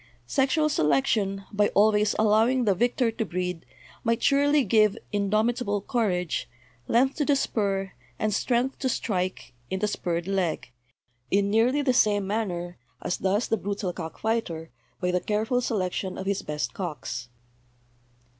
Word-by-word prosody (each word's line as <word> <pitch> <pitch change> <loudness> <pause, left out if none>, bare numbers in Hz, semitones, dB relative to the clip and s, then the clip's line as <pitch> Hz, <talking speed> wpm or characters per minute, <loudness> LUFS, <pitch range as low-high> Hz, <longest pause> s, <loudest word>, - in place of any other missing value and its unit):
Sexual 275 - +2
selection, 195 - +1
by 205 0 +3
always 210 0 +4
allowing 225 +4 +3
the 200 - +4
victor 240 +4 +1
to 225 0 -2
breed, 180 - -4 0.4
might 230 0 0
surely 285 +1 +4
give 215 -4 +3
indomitable 210 +2 +1
courage, 180 - -1 0.4
length 265 +3 +2
to 300 - +1
the 285 - +3
spur, 195 -7 -1 0.3
and 215 -1 0
strength 250 +5 0
to 260 - 0
strike 185 - -2 0.2
in 190 - -1
the 210 - +1
spurred 175 -3 -2
leg, 185 -9 -1 0.6
in 200 +1 +2
nearly 245 +7 +3
the 260 -2 +2
same 205 -4 +3
manner 180 -4 -3 0.2
as - - -2
does 200 +4 0
the 225 - +1
brutal 200 -2 -3
cockfighter 170 - -3 0.3
by 180 - 0
the 180 - +1
careful 220 +4 0
selec 195 -7 -1
tion 185 0 -4
of 190 - -5
his 200 0 0
best 150 0 -3
cocks. 130 - -5
205 Hz, 145 wpm, -26 LUFS, 180-230 Hz, 0.6 s, always